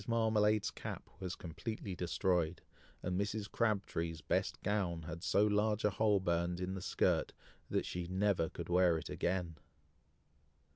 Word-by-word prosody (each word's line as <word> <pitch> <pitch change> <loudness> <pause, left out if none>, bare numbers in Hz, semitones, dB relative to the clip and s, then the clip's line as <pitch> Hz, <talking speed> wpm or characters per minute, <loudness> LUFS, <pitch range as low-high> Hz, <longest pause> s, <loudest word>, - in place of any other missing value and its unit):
Marmalade's 110 -2 +3
cap - - -7
was 90 -2 -3
completely 95 +4 -5
destroyed, 90 -1 0 0.4
and 90 +2 0
Mrs. 100 0 -3
Crabtree's 95 -7 0
best - - 0
gown 95 -5 0
had 85 +1 -6
so 100 +2 +3
large 105 +1 +2
a 105 - +4
hole 105 +1 +3
burned 85 -1 0
in 90 +1 -2
the 95 - -4
skirt, - - +1 0.4
that - - 0
she 90 -1 -3
never 95 -3 +1
could - - -6
wear 90 -1 +4
it 80 - -6
again! 85 -3 -1
95 Hz, 145 wpm, -35 LUFS, 85-105 Hz, 0.4 s, a